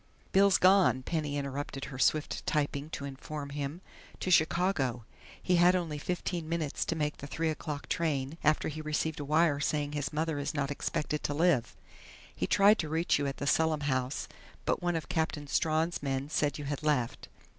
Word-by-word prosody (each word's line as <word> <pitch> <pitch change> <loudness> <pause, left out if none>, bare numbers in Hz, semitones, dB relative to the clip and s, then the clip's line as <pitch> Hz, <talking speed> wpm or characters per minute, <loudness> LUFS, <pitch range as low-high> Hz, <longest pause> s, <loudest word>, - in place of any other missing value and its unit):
"Bill's 195 0 +5
gone," 185 - +5
Penny 150 -2 -2
interrupted 140 0 -4
her 130 -3 -8
swift 155 +3 +1
typing 145 -1 -1
to 140 - -5
inform 140 +1 -6
him. 145 +4 -4 0.4
"To 185 - -1
Chicago. 160 - +2 0.3
He 180 -1 +2
had 175 +2 +6
only 165 -5 -2
fifteen 175 0 -3
minutes 165 -4 -1
to 165 - -1
make 150 -1 -1
the 140 - -8
three 160 +3 -1
o'clock 150 -2 -5
train, 150 -2 -1
after 155 0 +3
he 155 0 -5
received 155 0 -2
a - - -3
wire 155 0 +3
saying 145 -1 0
his 145 -1 -2
mother 155 -1 -1
is 145 +2 -3
not 140 -1 -1
expected 150 +1 -2
to 145 - -1
live. 160 -6 +2 0.6
He - - -1
tried 205 +2 +5
to 155 - -2
reach 160 -1 +1
you 145 - 0
at 135 - -4
the - - -4
Selim 160 +1 +2
house, 130 -1 -1 0.4
but - - 0
one 175 -1 0
of 160 -4 -3
Captain 160 -2 -1
Strawn's 160 +3 0
men 135 0 -2
said 145 -3 +1
you 145 - -6
had 145 0 -3
left." 145 -6 0
150 Hz, 190 wpm, -30 LUFS, 140-165 Hz, 0.6 s, had